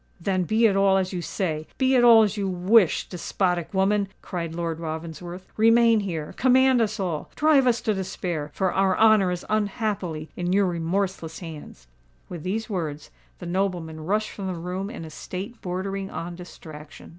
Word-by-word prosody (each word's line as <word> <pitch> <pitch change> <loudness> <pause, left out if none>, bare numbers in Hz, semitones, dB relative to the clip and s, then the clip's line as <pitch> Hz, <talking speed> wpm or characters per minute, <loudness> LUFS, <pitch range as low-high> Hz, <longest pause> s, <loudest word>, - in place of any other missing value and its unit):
"Then 185 +1 0
be 220 +5 +3
it 205 -3 +4
all 195 -1 +4
as 190 0 -1
you 180 - -3
say—be 180 - -1
it 250 -2 +5
all 230 -2 +8
as 210 -1 0
you 200 -2 -2
wish, 185 +1 +3
despotic 180 -1 -1
woman!" 200 +1 +2 0.2
cried 170 -3 -4
Lord 165 -1 -3
Ravensworth. 170 +3 -6
"Remain 230 0 +5
here—command 245 +9 +2
us 215 -1 -1
all—drive 255 - +1
us 240 -1 +2
to 215 - 0
despair—for 180 -2 -3
our 190 -1 +2
honour 215 -4 +5
is 180 -1 -4
unhappily 200 -7 -2
in 180 0 -1
your 200 0 +4
remorseless 170 -1 -2
hands." 155 - -10 0.4
With 175 -3 -7
these 210 +6 -3
words, 160 -8 -4 0.3
the 175 - -9
nobleman 175 -3 -2
rushed 210 +5 0
from 195 -2 -6
the 185 - -3
room 180 +4 -4
in 215 -8 -7
a 160 - -10
state 190 +8 -7
bordering 195 +2 -3
on 175 +1 -5
distraction. 155 -4 -11
185 Hz, 165 wpm, -25 LUFS, 170-210 Hz, 0.4 s, all